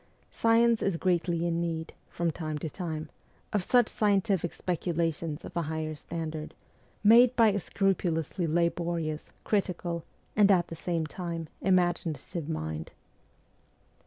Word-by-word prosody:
Science 230 0 +3
is 195 -4 +1
greatly 175 -1 +1
in 170 0 0
need, 165 -1 -3 0.2
from 170 -1 -1
time 155 -2 -4
to 155 - -4
time, 160 -2 -4 0.5
of 205 -3 +1
such 245 +3 +4
scientific 200 -4 +1
speculations 165 -3 -2
of - - -10
a 170 - +1
higher 155 0 -3
standard, 155 0 -5 0.5
made 235 +4 +7
by 230 -2 +6
a 205 0 0
scrupulously 175 -3 0
laborious, 170 -1 -1
critical, 175 -4 -1 0.3
and 205 -1 +6
at 175 -3 +3
the 165 - -6
same 165 0 -1
time, 165 0 -5
imaginative 175 -3 0
mind. 80 - -3
170 Hz, 130 wpm, -29 LUFS, 160-190 Hz, 0.5 s, made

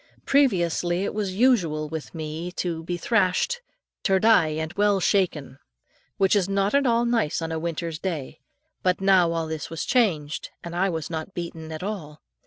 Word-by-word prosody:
Previously 180 - +2
it - - -2
was 200 -3 -2
usual 180 -11 +2
with 160 +2 -7
me 160 +2 -5
to 170 -3 -3
be 175 +1 -3
thrashed 220 - +1 0.4
"ter 190 -1 +3
die, 200 -5 +5
and 160 +1 -3
well 205 -1 +2
shaken," 150 -9 0 0.6
which 195 -1 +3
was 200 -2 +2
not 195 +1 +1
at 280 -1 +3
all 235 0 +3
nice 230 -10 +1
on 165 0 -4
a 160 - -2
winter's 165 -1 -3
day; 160 -11 -4 0.4
but 180 -1 +1
now 190 -3 +4
all 165 -1 -1
this 160 -1 -5
was 165 -1 -4
changed, 165 - +1
and 170 0 -6
I 190 +2 +2
was 160 -2 -4
not 160 +4 -5
beaten 165 -2 -6
at 155 +2 -6
all. 170 -8 -5
175 Hz, 180 wpm, -25 LUFS, 160-200 Hz, 0.6 s, die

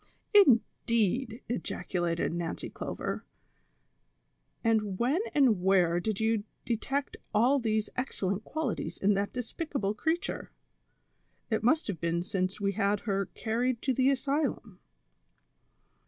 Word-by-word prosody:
217 285 - +7 0.2
"Indeed," 230 +2 +1
ejaculated 175 -7 -1
jSTancy 170 -1 -4
Clover; - - -4 1.4
"and 215 -4 +1
when 270 - +2
and 250 -10 +4
where 180 -2 +4
did 210 +2 -2
you 220 -1 +1 0.2
detect 270 +4 -2 0.2
all 250 +6 +4
these 220 -3 0
excellent 205 -6 -2
qualities 310 -4 -3
in 205 +1 +3
that 200 +1 -1
despicable 250 - -2
creature 320 - -2 1.0
V 220 - +3
It - - -9
must 310 +8 +3
have 190 -7 -4
been 170 0 0
since 185 0 -2
we 200 -1 +1
had 200 0 +1
her 195 -3 -1
carried 235 +2 0
to 265 - +2
the 260 +2 +3
asylum." 275 -7 -1
220 Hz, 125 wpm, -30 LUFS, 195-255 Hz, 1.4 s, 217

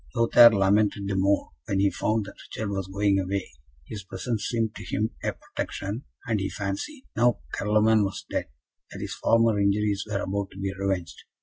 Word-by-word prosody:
Lothaire 115 0 +8
lamented 100 -1 +2
the 100 - -1
more 100 +1 +1 0.2
when 95 - 0
he 100 0 +3
found 110 -1 0
that 100 - -9 0.2
Richard 110 -2 -4
was 95 -2 -3
going 100 0 +2
away; 95 -4 -2 0.3
his 100 +5 -7
presence 105 +4 -3
seemed 115 -2 -1
to - - -9
him 110 +3 -1
a - - 0
protection, 105 +8 -5 0.2
and 110 -2 0
he 95 0 -2
fancied, 100 - -4
now 120 - +3
Carloman 110 +1 +3
was 100 0 -4
dead, - - -2 0.4
that - - -9
his - - -4
former 115 -2 +3
injuries 100 0 +1
were 100 -1 -1
about 100 0 -2
to - - -13
be 95 0 -2
revenged. 95 -3 -2
100 Hz, 185 wpm, -26 LUFS, 95-110 Hz, 0.4 s, Lothaire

